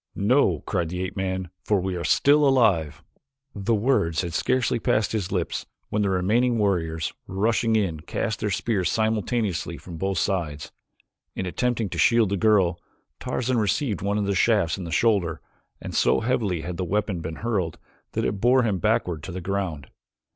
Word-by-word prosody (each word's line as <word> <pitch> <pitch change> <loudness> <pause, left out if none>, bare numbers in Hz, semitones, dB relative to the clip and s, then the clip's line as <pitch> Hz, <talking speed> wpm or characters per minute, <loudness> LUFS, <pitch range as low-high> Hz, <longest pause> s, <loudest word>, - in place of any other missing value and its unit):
"No," 125 +8 +2
cried 85 -5 -1
the 90 +2 -3
ape 95 +2 -5
man, 95 -2 -3
"for 105 -2 +2
we 95 0 -2
still 145 - +4
live!" 95 - +2 0.5
The 105 +3 0
words 100 - +1
had 85 -2 -4
scarcely 125 +5 +1
passed 110 -2 +1
his 100 -4 -2
lips 90 -4 -2 0.2
when 105 - 0
the 100 - +1
remaining 110 +7 +2
warriors, 80 -6 0
rushing 110 +3 +1
in, 95 -8 0
cast 100 +6 -3
their 105 - -1
spears 95 -2 0
simultaneously 110 -5 -1
from 85 -3 -9
both 95 +2 -1
sides. 80 -6 -2 0.6
In 95 - -3
attempting 115 +4 -1
to - - -5
shield 115 -4 +4
the 100 - 0
girl, 95 -5 +3 0.4
Tarzan 125 -1 -1
received 105 - 0
one 100 +2 0
of 105 - 0
the 100 - 0
shafts 95 -4 +2
in 95 - -6
the 85 - -6
shoulder, 95 -8 +2 0.4
and - - -7
so - - +3
heavily 110 -8 0
had 85 +1 -5
the 95 - -2
weapon 100 0 -1
been 80 0 -5
hurled 95 -8 -1 0.4
that - - -1
it 100 -1 -2
bore 125 +2 +4
him 105 -5 0
backward 80 -1 0
to 95 - -7
the 90 - -5
ground. 90 -7 -3
100 Hz, 175 wpm, -25 LUFS, 90-110 Hz, 0.6 s, still